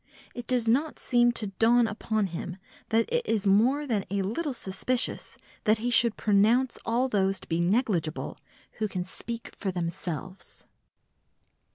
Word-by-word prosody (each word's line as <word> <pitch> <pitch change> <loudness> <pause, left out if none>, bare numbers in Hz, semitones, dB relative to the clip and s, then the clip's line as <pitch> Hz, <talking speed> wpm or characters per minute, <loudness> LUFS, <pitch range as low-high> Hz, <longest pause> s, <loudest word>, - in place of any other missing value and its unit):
It 245 -1 -7
does 245 -3 +1
not 285 +7 +2
seem 240 -1 +3
to 225 - -1
dawn 225 +5 +3
upon 220 -1 -1
him 180 0 -5 0.3
that 225 0 +3
it 485 0 +2
is 220 - -1
more 240 +9 +3
than 220 -7 0
a 200 0 0
little 280 - -2
suspicious 235 +5 -2 0.3
that 215 +1 +4
he 240 +3 -2
should 235 -2 +4
pronounce 220 +5 +3
all 240 +3 +2
those 195 -4 +1
to - - -13
be 165 0 0
negligible 180 -5 0 0.4
who 215 - +1
can 185 -3 -3
speak 230 +5 -6
for 200 - -3
themselves. 175 +1 -5
220 Hz, 155 wpm, -28 LUFS, 195-240 Hz, 0.4 s, that